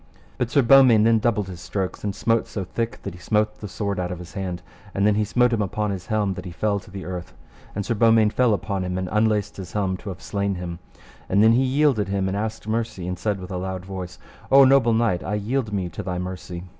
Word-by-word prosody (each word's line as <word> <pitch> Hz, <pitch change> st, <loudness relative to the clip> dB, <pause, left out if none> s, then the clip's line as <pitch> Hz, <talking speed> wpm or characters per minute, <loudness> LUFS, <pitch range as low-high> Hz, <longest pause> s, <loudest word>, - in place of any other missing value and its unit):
But 125 Hz, -, 0 dB
Sir 140 Hz, +2 st, +3 dB
Beaumains 120 Hz, -3 st, +7 dB
then 115 Hz, 0 st, +4 dB
doubled 105 Hz, -3 st, 0 dB
his 90 Hz, -2 st, -8 dB
strokes, 95 Hz, 0 st, -4 dB
and 100 Hz, -2 st, -2 dB
smote 115 Hz, +1 st, +1 dB
so 100 Hz, -, -4 dB
thick 115 Hz, +5 st, -3 dB
that 100 Hz, -, -5 dB
he 90 Hz, -, -12 dB
smote 105 Hz, +3 st, 0 dB
the 105 Hz, -, -6 dB
sword 100 Hz, 0 st, -3 dB
out 90 Hz, -1 st, -2 dB
of 90 Hz, -, -4 dB
his 90 Hz, 0 st, -11 dB
hand, 90 Hz, -3 st, -4 dB, 0.3 s
and 100 Hz, -, +2 dB
then 105 Hz, -, +4 dB
he 105 Hz, +1 st, +1 dB
smote 120 Hz, +3 st, +2 dB
him 110 Hz, -, +1 dB
upon 105 Hz, +1 st, -1 dB
the 95 Hz, -3 st, -4 dB
helm 105 Hz, -3 st, +1 dB
that 90 Hz, 0 st, -8 dB
he -, -, -5 dB
fell 100 Hz, +4 st, -1 dB
to 100 Hz, -, -16 dB
the 95 Hz, -1 st, -7 dB
earth, 90 Hz, -1 st, -6 dB, 0.4 s
and 100 Hz, 0 st, -2 dB
Sir -, -, 0 dB
Beaumains 115 Hz, -1 st, +4 dB
fell 125 Hz, -4 st, +3 dB
upon 100 Hz, -2 st, -3 dB
him, 90 Hz, 0 st, -3 dB
and 95 Hz, 0 st, -2 dB
unlaced 105 Hz, -1 st, +1 dB
his 95 Hz, -2 st, -8 dB
helm 95 Hz, -3 st, 0 dB
to 100 Hz, -, -8 dB
have 95 Hz, -1 st, -7 dB
slain 100 Hz, -1 st, -1 dB
him; 85 Hz, -1 st, -6 dB, 0.5 s
and 100 Hz, +3 st, +4 dB
then 110 Hz, -, +7 dB
he 120 Hz, +3 st, +4 dB
yielded 135 Hz, -5 st, +2 dB
him 95 Hz, -1 st, -1 dB
and 95 Hz, -, -2 dB
asked 110 Hz, +1 st, -4 dB
mercy, 110 Hz, -5 st, -2 dB
and 90 Hz, -1 st, -4 dB
said 105 Hz, 0 st, -1 dB
with 90 Hz, +1 st, -8 dB
a 90 Hz, -, -2 dB
loud 95 Hz, 0 st, -4 dB
voice: 95 Hz, -2 st, -7 dB, 0.3 s
O 135 Hz, 0 st, +8 dB
noble 130 Hz, -3 st, +5 dB
knight, 110 Hz, -6 st, +1 dB
I 105 Hz, -, -2 dB
yield 110 Hz, +3 st, -1 dB
me 95 Hz, -3 st, -1 dB
to -, -, -6 dB
thy 90 Hz, -1 st, -3 dB
mercy. 90 Hz, -1 st, -6 dB
100 Hz, 255 wpm, -23 LUFS, 95-110 Hz, 0.5 s, O